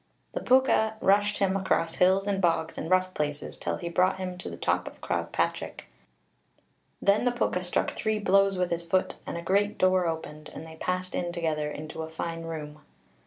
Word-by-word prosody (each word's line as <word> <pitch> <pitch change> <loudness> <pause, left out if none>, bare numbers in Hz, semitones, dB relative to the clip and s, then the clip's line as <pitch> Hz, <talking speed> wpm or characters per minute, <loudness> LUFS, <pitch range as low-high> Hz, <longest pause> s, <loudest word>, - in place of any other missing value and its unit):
The - - -1
Púca 255 -4 +4
rushed 205 +1 +3
him 195 -1 +2
across 175 -4 +1
hills 190 +2 +4
and 200 -1 0
bogs 165 -2 +1
and 160 - -5
rough 185 0 +3
places, 150 -3 -3
till - - -2
he 170 - -5
brought 185 +2 +2
him 185 -1 -4
to - - -5
the - - -7
top - - 0
of - - -9
Croagh - - -2
Patric. - - -2 1.1
Then 200 +3 +3
the 245 - +3
Púca 185 -6 0
struck 180 - 0
three 215 -1 -1
blows 195 -1 +3
with 180 -1 0
his 170 0 0
foot, 185 +2 0
and - - -3
a 170 - -5
great 200 +4 +1
door 185 -1 +3
opened, 155 -2 -5
and 160 - -7
they 160 0 -11
passed 185 +2 -2
in 175 -1 -1
together, 155 -3 -1
into 155 +2 -6
a 160 - -5
fine 165 +1 -4
room. 150 -2 -6
180 Hz, 200 wpm, -28 LUFS, 165-195 Hz, 1.1 s, Púca